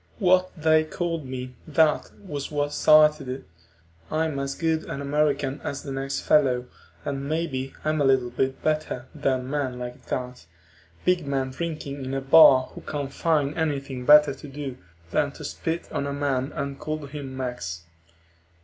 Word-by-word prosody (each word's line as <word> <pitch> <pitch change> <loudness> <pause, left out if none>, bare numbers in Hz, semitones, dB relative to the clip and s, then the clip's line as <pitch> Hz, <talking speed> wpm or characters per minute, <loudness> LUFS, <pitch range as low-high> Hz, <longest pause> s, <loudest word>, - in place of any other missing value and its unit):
What 185 -2 +3
they 155 0 +4
called 165 -2 -3
me, 130 0 -6
that 155 0 +3 0.2
was 145 -6 -4
what 145 -1 -1
started 155 -3 +5
it. 130 - -6 0.6
I'm 155 -2 0
as 140 0 -3
good 160 -1 0
an - - -5
American 140 -1 0
as 140 - -4
the 140 - -6
next 135 +1 -3
fellow, 130 -5 +3 0.4
and 140 0 -3
maybe 140 -5 -2
a 155 - +2
little 135 -5 +2
bit 130 +2 -1
better 155 -5 -1
than 130 -2 -1
men 135 -3 -2
like 125 0 -8
that, 125 -9 -4 0.6
big 180 -5 +2
men 135 -1 -1
drinking 145 -2 -5
in 130 +1 -3
a - - 0
bar 135 -2 +7
who - - -9
can't 145 -2 -4
find 155 -3 +1
anything 140 -5 -2
better 150 +1 +7
to 140 - -11
do 135 -2 -6 0.3
than 140 +7 +1
to 150 - -10
spit 165 +3 -3
on 140 -2 -2
a 140 - -3
man 140 -1 -1
and 140 -2 -4
call 155 -1 -4
him 140 -2 -7
Mex. 125 -11 -4
140 Hz, 165 wpm, -25 LUFS, 130-155 Hz, 0.6 s, bar